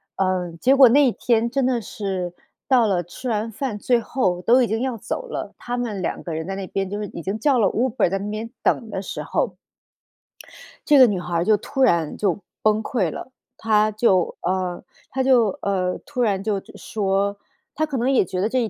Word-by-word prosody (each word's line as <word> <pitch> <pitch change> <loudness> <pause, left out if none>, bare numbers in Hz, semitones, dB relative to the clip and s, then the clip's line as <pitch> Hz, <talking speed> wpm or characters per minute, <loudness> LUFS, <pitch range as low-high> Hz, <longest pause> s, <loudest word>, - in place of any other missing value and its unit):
嗯， 180 -3 -1
结 265 +2 +4
果 265 -2 +8
那 285 +3 +5
一 245 - +3
天 235 0 +1
真 270 0 0
的 250 -3 +1
是 190 -4 -4 0.3
到 245 -4 +4
了 180 -3 +1
吃 240 +9 -7
完 220 +1 -1
饭 225 -1 -3
最 245 +1 +2
后 185 -7 -1
都 250 +3 +5
已 - - +1
经 220 +1 -1
要 260 -2 -1
走 365 - -5
了， - - -5
他 245 0 -4
们 215 -6 -3
两 - - -3
个 170 - -5
人 160 +2 -4
在 195 - -3
那 195 -1 -5
边 195 -1 -2
就 205 - -4
是 210 - -4
已 170 - -8
经 195 +6 -3
叫 270 -1 +3
了 200 - +4
Uber 235 -6 +1
在 195 - -1
那 205 +1 -4
边 220 +2 -4
等 225 - +1
的 190 - -4
时 - - -6
候。 - - -1 1.3
这 295 -2 +6
个 255 - +10
女 195 -4 -1
孩 175 -1 -4
儿 170 +1 +1
就 215 - +5
突 270 +6 -4
然 170 - +2
就 200 -3 0 0.2
崩 215 0 +3
溃 195 - -1
了， - - -7 0.3
她 215 -1 +2
就 200 -5 +2
呃， 180 0 -2 0.3
她 265 0 -1
就 240 -7 +3
呃， 185 -2 -1
突 265 -4 -3
然 200 -4 +1
就 210 -3 0 0.2
说， 200 -1 -1 0.4
她 310 - +1
可 280 -4 -4
能 245 +3 +1
也 240 -8 +3
觉 185 +2 -3
得 215 - +1
这 255 0 +1
一 225 - -1
215 Hz, 245 characters per minute, -22 LUFS, 190-245 Hz, 1.3 s, 个